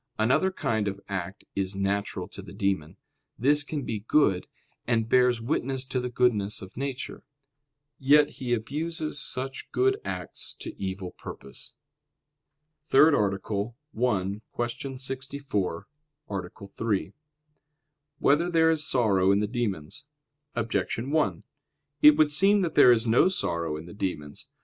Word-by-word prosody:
Another 125 Hz, +12 st, +3 dB
kind 110 Hz, -, -1 dB
of 100 Hz, 0 st, -3 dB
act 95 Hz, 0 st, -5 dB
is 95 Hz, 0 st, -2 dB
natural 100 Hz, +1 st, -1 dB
to -, -, -9 dB
the -, -, -11 dB
demon; 95 Hz, -6 st, -1 dB, 0.4 s
this 145 Hz, +5 st, +3 dB
can 145 Hz, 0 st, -4 dB
be 110 Hz, -3 st, -3 dB
good 105 Hz, -4 st, +2 dB, 0.4 s
and 115 Hz, -2 st, +1 dB
bears 125 Hz, 0 st, +4 dB
witness 130 Hz, +1 st, -2 dB
to 130 Hz, -1 st, -2 dB
the 125 Hz, 0 st, -3 dB
goodness 110 Hz, -5 st, +1 dB
of 95 Hz, -, -12 dB
nature. 135 Hz, +2 st, -5 dB, 0.8 s
Yet 145 Hz, +2 st, +5 dB
he 120 Hz, -2 st, -1 dB
abuses 150 Hz, +9 st, -4 dB
even 135 Hz, -2 st, 0 dB
such -, -, -10 dB
good 395 Hz, +2 st, +2 dB
acts -, -, -5 dB
to -, -, -6 dB
evil 95 Hz, -1 st, -4 dB
purpose. 70 Hz, -, -10 dB, 1.1 s
_______________________ -, -, -31 dB
THIRD 150 Hz, +4 st, +7 dB
ARTICLE 100 Hz, +1 st, -1 dB, 0.2 s
[I, 105 Hz, -4 st, 0 dB, 0.2 s
Q. 120 Hz, +3 st, -3 dB
64, 130 Hz, -8 st, -3 dB, 0.4 s
Art. 95 Hz, -3 st, -5 dB, 0.2 s
3] 105 Hz, -3 st, -1 dB, 1.0 s
Whether 155 Hz, +6 st, +3 dB
There 165 Hz, -1 st, +4 dB
Is 155 Hz, -1 st, -1 dB
Sorrow 100 Hz, -6 st, +3 dB
in 100 Hz, -, +3 dB
the 105 Hz, -, +1 dB
Demons? 110 Hz, -, -4 dB, 0.5 s
Objection 115 Hz, +2 st, -1 dB
1: 155 Hz, -1 st, +1 dB, 0.6 s
It 150 Hz, 0 st, +8 dB
would 155 Hz, -1 st, +4 dB
seem 195 Hz, +6 st, +4 dB
that 170 Hz, -4 st, -1 dB
there 125 Hz, -, +8 dB
is 115 Hz, -1 st, +3 dB
no 115 Hz, +9 st, +5 dB
sorrow 85 Hz, -, -1 dB
in 80 Hz, -, -8 dB
the 85 Hz, -, -10 dB
demons. 75 Hz, -8 st, -5 dB
120 Hz, 145 wpm, -27 LUFS, 100-140 Hz, 1.1 s, It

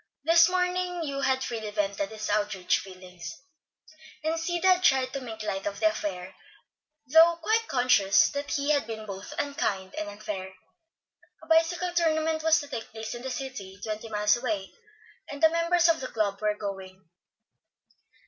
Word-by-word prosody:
This 330 Hz, +2 st, +6 dB
morning 360 Hz, -1 st, -1 dB
Hugh 275 Hz, -2 st, -3 dB
had 265 Hz, -1 st, +1 dB
freely 220 Hz, -3 st, -4 dB
vented 200 Hz, -1 st, -2 dB
his 215 Hz, -1 st, -6 dB
outraged 205 Hz, -3 st, +1 dB
feelings, 185 Hz, 0 st, -10 dB, 0.8 s
and 320 Hz, +1 st, 0 dB
Sid 345 Hz, +1 st, -2 dB
had 370 Hz, -1 st, +5 dB
tried 265 Hz, -5 st, +3 dB
to 275 Hz, -, -3 dB
make 220 Hz, -3 st, -7 dB
light 195 Hz, -2 st, -3 dB
of 200 Hz, 0 st, -4 dB
the 320 Hz, -, +4 dB
affair, 190 Hz, -, -5 dB, 0.7 s
though 325 Hz, +5 st, +6 dB
quite 440 Hz, +7 st, 0 dB
conscious 245 Hz, -6 st, +4 dB
that 285 Hz, 0 st, -5 dB
he 285 Hz, +1 st, 0 dB
had 285 Hz, -6 st, +1 dB
been 220 Hz, -1 st, -6 dB
both 195 Hz, -1 st, -8 dB
unkind 200 Hz, -10 st, -2 dB
and 210 Hz, -1 st, -4 dB
unfair. 205 Hz, -2 st, -6 dB, 0.9 s
A -, -, -11 dB
bicycle 335 Hz, +2 st, +2 dB
tournament 320 Hz, -2 st, +1 dB
was 320 Hz, 0 st, +4 dB
to 290 Hz, -, -9 dB
take 235 Hz, -5 st, -6 dB
place 220 Hz, 0 st, -6 dB
in 240 Hz, -, -7 dB
the 265 Hz, -, -5 dB
city, 250 Hz, -8 st, -6 dB
twenty 215 Hz, +1 st, -5 dB
miles 210 Hz, -1 st, +3 dB
away, 220 Hz, -6 st, -3 dB, 0.6 s
and 285 Hz, +2 st, -7 dB
the 320 Hz, -, +8 dB
members 335 Hz, +1 st, +3 dB
of 330 Hz, -1 st, +3 dB
the 260 Hz, -, -4 dB
club 205 Hz, -4 st, -2 dB
were 210 Hz, -1 st, 0 dB
going. 190 Hz, -3 st, -7 dB
245 Hz, 165 wpm, -27 LUFS, 205-320 Hz, 0.9 s, the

